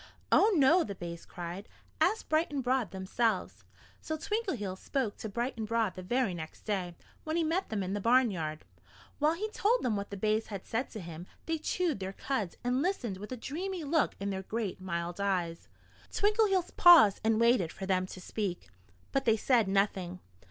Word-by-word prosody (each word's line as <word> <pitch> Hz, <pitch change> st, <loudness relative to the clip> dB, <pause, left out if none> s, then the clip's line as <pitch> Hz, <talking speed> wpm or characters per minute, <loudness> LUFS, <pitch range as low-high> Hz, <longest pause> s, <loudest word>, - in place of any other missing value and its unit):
"Oh, 435 Hz, -, +6 dB
no!" 315 Hz, +5 st, +5 dB
the 200 Hz, -, -6 dB
bays 170 Hz, -2 st, -7 dB
cried. 175 Hz, +3 st, -7 dB, 0.3 s
"Ask 440 Hz, -, +2 dB
Bright 310 Hz, 0 st, +1 dB
and 280 Hz, -2 st, -2 dB
Broad 250 Hz, -2 st, +1 dB
themselves." 190 Hz, +1 st, -1 dB, 0.4 s
So 315 Hz, -, -3 dB
Twinkleheels 300 Hz, -, -2 dB
spoke 260 Hz, -7 st, -2 dB
to 220 Hz, -, -5 dB
Bright 240 Hz, +5 st, -2 dB
and 220 Hz, -1 st, -3 dB
Broad 225 Hz, -3 st, +1 dB
the 185 Hz, -, -8 dB
very 240 Hz, +1 st, 0 dB
next 160 Hz, -2 st, -8 dB
day, 185 Hz, -5 st, -2 dB, 0.3 s
when 315 Hz, +1 st, -2 dB
he 335 Hz, -, +2 dB
met 335 Hz, +5 st, 0 dB
them 210 Hz, -3 st, -1 dB
in 185 Hz, +1 st, -3 dB
the 205 Hz, -, -2 dB
barnyard. 195 Hz, -11 st, +2 dB, 0.5 s
While 305 Hz, +2 st, +3 dB
he 420 Hz, +5 st, -2 dB
told 460 Hz, +4 st, +2 dB
them 230 Hz, -4 st, +1 dB
what 200 Hz, 0 st, -4 dB
the 200 Hz, -, -6 dB
bays 215 Hz, +2 st, +1 dB
had 200 Hz, -3 st, -6 dB
said 235 Hz, +3 st, -2 dB
to 215 Hz, -, -6 dB
him 170 Hz, +1 st, -8 dB, 0.2 s
they 325 Hz, -1 st, -1 dB
chewed 320 Hz, -, -1 dB
their 190 Hz, 0 st, -4 dB
cuds 215 Hz, -6 st, -3 dB
and 250 Hz, +2 st, +1 dB
listened 265 Hz, -, -1 dB
with 210 Hz, +4 st, -9 dB
a 255 Hz, -, -3 dB
dreamy 345 Hz, +8 st, -4 dB
look 305 Hz, +2 st, +1 dB
in 200 Hz, +1 st, -2 dB
their 190 Hz, 0 st, -3 dB
great, 205 Hz, -1 st, -4 dB
mild 175 Hz, 0 st, -3 dB
eyes. 180 Hz, -4 st, -1 dB, 0.4 s
Twinkleheels 410 Hz, -3 st, +2 dB
paused 335 Hz, -, +8 dB
and 220 Hz, 0 st, +3 dB
waited 230 Hz, -8 st, +3 dB
for 190 Hz, -, -6 dB
them 185 Hz, -1 st, +1 dB
to 185 Hz, -, -9 dB
speak. 185 Hz, -, -4 dB, 0.4 s
But 270 Hz, 0 st, 0 dB
they 225 Hz, -2 st, +4 dB
said 230 Hz, -2 st, +3 dB
nothing. 190 Hz, -2 st, 0 dB
220 Hz, 195 wpm, -31 LUFS, 190-285 Hz, 0.5 s, paused